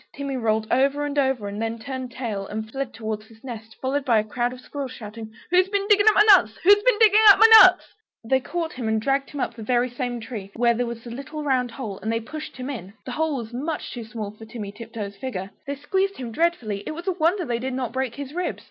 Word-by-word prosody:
Timmy 280 -1 -4
rolled 220 -3 0
over 280 +3 +2
and 290 0 -4
over, 265 -6 0
and 205 +2 -5
then 225 0 -2
turned 260 +1 -6
tail 220 -6 -4
and 220 +1 -5
fled 270 -1 -4
towards 220 -1 -5
his 225 0 -19
nest, 225 -3 -8
followed 270 +2 -1
by 240 -4 +3
a 215 - +2
crowd 240 +3 -2
of 255 - -9
squirrels 275 0 -6
shouting 220 -1 -9 0.2
"Who's 365 +1 +4
been 400 0 -1
digging 415 0 +5
up 430 - +2
my 420 - +7
nuts?" 420 - +7 0.3
They 260 +4 +2
caught 330 +5 -4
him 245 -3 -4
and 220 0 +1
dragged 275 +4 0
him 290 - -7
up 235 - -1
the 230 - -11
very 245 +2 +1
same 245 -1 -3
tree, 220 -4 -7
where 235 0 +3
there 240 +1 -1
was 235 -1 -7
the 235 - -9
little 280 +5 -6
round 255 -3 +1
hole, 225 -5 -6
and 220 - -3
they 230 - 0
pushed 305 +7 -8
him 255 0 -5
in. 200 -7 -8
The 255 - -5
hole 310 +1 -1
was 235 -1 -7
much 295 +6 -4
too 240 - -6
small 220 -2 -6
for 215 +1 -13
Timmy 215 -2 -7
Tiptoes' 210 -2 -7
figure. 195 -7 -5 0.2
They 280 - -2
squeezed 380 +8 -1
him 245 -3 -6
dreadfully, 225 -9 -1
it 310 - -4
was 340 - -8
a 385 - +1
wonder 350 +2 +1
they 235 -2 -2
did 260 +1 -3
not 250 -3 -3
break 260 -2 -2
his 280 0 -7
ribs. 360 +1 -3
250 Hz, 235 wpm, -24 LUFS, 225-290 Hz, 0.3 s, my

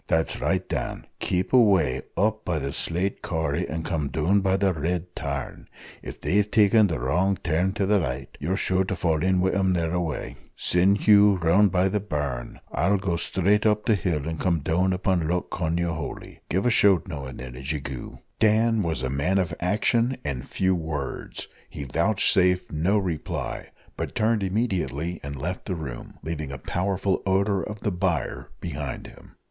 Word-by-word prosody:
"That's 80 0 0
right, - - 0
Dan - - -3
keep 90 +5 -1
away 95 - +4 0.2
up 110 +2 +1
by 85 -3 -1
the 70 -2 -3
slate 90 +4 -2
corrie, 80 -3 -1
and 80 +1 -3
come 80 -4 -1
down 80 +8 +2
by 95 0 +2
the 95 -1 +2
red 90 +3 -3
tarn. 70 -3 -5 0.3
If - - -8
they've 105 +2 +1
taken 105 0 +5
the 80 -7 -2
wrong 90 +10 +1
turn 90 +4 +1
to 100 - 0
the 100 0 +3
right, 65 -3 -3
you're 90 +7 -1
sure 95 -1 +1
to 95 - -2
fall 80 -2 0
in 95 +1 +2
wi' 95 +1 +2
them 95 -1 +2
thereaway. 85 -2 -2 0.2
Send 95 +3 +2
Hugh 105 -1 +6
round 90 +5 +4
by 95 0 +3
the 105 +2 0
burn; 75 -10 -4
I'll 100 +6 +2
go 95 -3 -1
straight 100 +5 +2
up 105 0 +1
the 115 - +4
hill, 80 -6 -1
and 80 -1 -4
come 85 -4 +1
down 90 +6 +1
upon 90 -3 0
Loch 90 +2 -1
Cognahoighliey. 85 -2 -3
Give 95 +6 0
a 120 - +4
shout 100 -4 +4
now 75 -6 -5
and 65 - -8
then, 65 -1 -8
as 65 +3 -4
ye 75 - -1
goo." 65 -2 -7 0.2
Dan 110 +1 +3
was 80 -8 -1
a 65 - -1
man 70 +8 +1
of 90 -4 0
action 115 +7 +1
and 70 -3 -3
few 95 0 +1
words: 80 -5 -4 0.2
he 70 - -6
vouchsafed 90 - +2
no 85 +7 +2
reply, 90 -7 -3 0.3
but - - -5
turned 110 0 +2
immediately 90 - -1
and 70 +1 -6
left 85 +7 -4
the 95 - -2
room, 70 -7 -7
leaving 75 -3 -4
a 65 - -5
powerful 95 +6 -1
odour 100 +1 +2
of 105 0 -6
the 105 - 0
byre 90 -2 -2
behind 75 -5 -5
him. - - -14
90 Hz, 185 wpm, -25 LUFS, 80-100 Hz, 0.3 s, Hugh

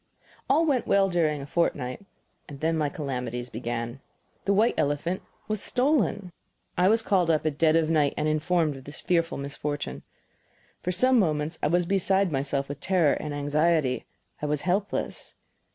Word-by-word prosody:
All 305 +5 +4
went 270 -6 +1
well 195 -1 +4
during 155 -4 +1
a - - -6
fortnight 145 -2 -1 0.4
then 155 +3 -1
my 150 -2 0
calamities 125 -4 -4
began. 120 +2 -4 0.5
The 200 - +3
white 220 +4 +4
elephant 145 +6 -1 0.3
was 215 -2 -2
stolen! 235 - +1 0.4
I 180 - +3
was 225 +1 +4
called 185 -5 +2
up 155 -1 +2
at 150 -2 -1
dead 160 -1 +4
of 165 -1 +3
night 150 -3 +2
and 150 - 0
informed 155 -1 +1
of 130 - -13
this 145 - -7
fearful 170 -1 0
misfortune. 140 - -4 0.8
For 180 - -1
some 255 +7 +4
moments 155 -3 0
I - - +2
was 175 +3 +2
beside 195 0 +2
myself 140 0 -1
with 145 0 -6
terror 175 -4 +3
and 150 - -4
anxiety; 145 -1 +1 0.3
I 150 - -1
was 150 -1 -1
helpless. 195 +3 -2
155 Hz, 165 wpm, -27 LUFS, 145-185 Hz, 0.8 s, All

